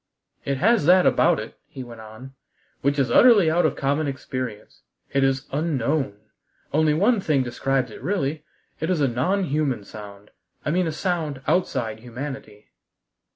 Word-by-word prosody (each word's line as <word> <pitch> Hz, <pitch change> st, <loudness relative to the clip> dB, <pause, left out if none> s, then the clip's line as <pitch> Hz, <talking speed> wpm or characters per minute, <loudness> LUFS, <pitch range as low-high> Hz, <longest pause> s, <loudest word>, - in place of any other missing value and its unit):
"It 140 Hz, -1 st, -1 dB
has 215 Hz, -, +3 dB
that 180 Hz, +1 st, +6 dB
about -, -, +4 dB
it," -, -, -9 dB
he 130 Hz, -, -8 dB
went 120 Hz, -2 st, -11 dB
on, 110 Hz, +5 st, -11 dB, 0.5 s
"which 140 Hz, +1 st, +1 dB
is 130 Hz, -4 st, +1 dB
utterly 205 Hz, -, +6 dB
out 175 Hz, +2 st, +3 dB
of -, -, -3 dB
common 145 Hz, +2 st, 0 dB
experience. 130 Hz, -5 st, -6 dB, 0.3 s
It 140 Hz, -, +2 dB
is 135 Hz, +1 st, +1 dB
unknown. 140 Hz, -5 st, -1 dB, 0.6 s
Only 155 Hz, 0 st, +3 dB
one 205 Hz, +6 st, +3 dB
thing 145 Hz, -7 st, +1 dB
describes 130 Hz, 0 st, -1 dB
it -, -, -11 dB
really: 155 Hz, -2 st, -2 dB, 0.4 s
it 160 Hz, -, -2 dB
is 180 Hz, -3 st, +1 dB
a 140 Hz, -, +3 dB
non 140 Hz, +12 st, 0 dB
human 140 Hz, -, -1 dB
sound; 100 Hz, -1 st, -11 dB, 0.3 s
I 150 Hz, -, 0 dB
mean 180 Hz, +1 st, +1 dB
a -, -, -1 dB
sound 155 Hz, -5 st, -2 dB
outside 120 Hz, -11 st, 0 dB
humanity." 125 Hz, -3 st, -8 dB
140 Hz, 160 wpm, -23 LUFS, 125-160 Hz, 0.6 s, that